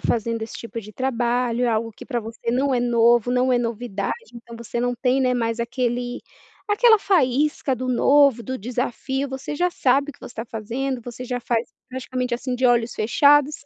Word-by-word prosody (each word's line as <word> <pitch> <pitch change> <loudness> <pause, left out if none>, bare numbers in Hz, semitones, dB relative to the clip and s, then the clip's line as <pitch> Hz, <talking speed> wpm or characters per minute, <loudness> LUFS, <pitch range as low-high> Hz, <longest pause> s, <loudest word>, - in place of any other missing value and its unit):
fazendo 230 0 -1
esse 220 - -6
tipo 230 0 -6
de 215 0 -12
trabalho. 245 -1 0
É - - +2
algo 225 0 -1
que - - -12
pra 245 -4 -2
você 230 +1 -5
não 265 +2 +1
é 245 - +1
novo, 240 0 +3
não 250 +1 +2
é 245 - +3
novidade. 230 -4 -2 0.2
Então, 235 0 -11
você 235 +1 -4
não 245 0 0
tem, 255 +2 +1
né, 255 -1 +2
mais 230 -1 -1
aquele 245 0 -2 0.5
aquela 440 +1 +5
faísca 290 -6 +2
do 255 +1 -4
novo, 270 -1 +4
do 260 +1 -4
desafio. 255 +4 -3
Você 265 +2 -5
já 355 +4 +1
sabe 280 -1 +2
o - - -13
que - - -24
você - - -10
tá 225 - -4
fazendo, 240 +4 -4
você 245 +1 -8
já 250 0 -3
faz 235 -1 -1 0.2
praticamente 255 -1 -3
assim, 250 +1 -3
de 255 0 +2
olhos 240 -1 +2
fechados, 290 +6 +4
245 Hz, 200 wpm, -23 LUFS, 235-265 Hz, 0.5 s, aquela